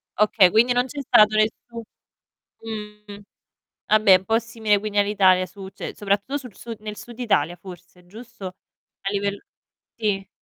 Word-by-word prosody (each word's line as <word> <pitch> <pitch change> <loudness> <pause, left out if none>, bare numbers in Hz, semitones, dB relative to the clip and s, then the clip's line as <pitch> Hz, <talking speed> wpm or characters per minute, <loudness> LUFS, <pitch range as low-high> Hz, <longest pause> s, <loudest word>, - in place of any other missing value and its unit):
Okay, 210 -3 +4
quindi 235 +6 +3
non 245 0 +1
c'è 290 - -7
stato 215 -4 +5
nessun 225 +2 -1 1.1
mh. 210 -1 -12 0.7
Vabbè, 215 -3 +6
un 190 - -15
po' 225 +2 +2
simile 225 -2 0
quindi 210 0 -5
all'Italia 195 -3 +3
su 190 +1 -11
cioè - - -8
soprattutto 205 +7 -1
sul 250 -7 -11
su 230 -1 -8
nel 210 -1 -7
Sud 240 -1 -11
Italia 175 -9 +1
forse, 180 0 -14
giusto? 225 +2 -12
A 190 +1 -11
livell 200 0 -2 0.6
sì. 200 -4 -2
210 Hz, 150 wpm, -23 LUFS, 195-225 Hz, 1.1 s, Vabbè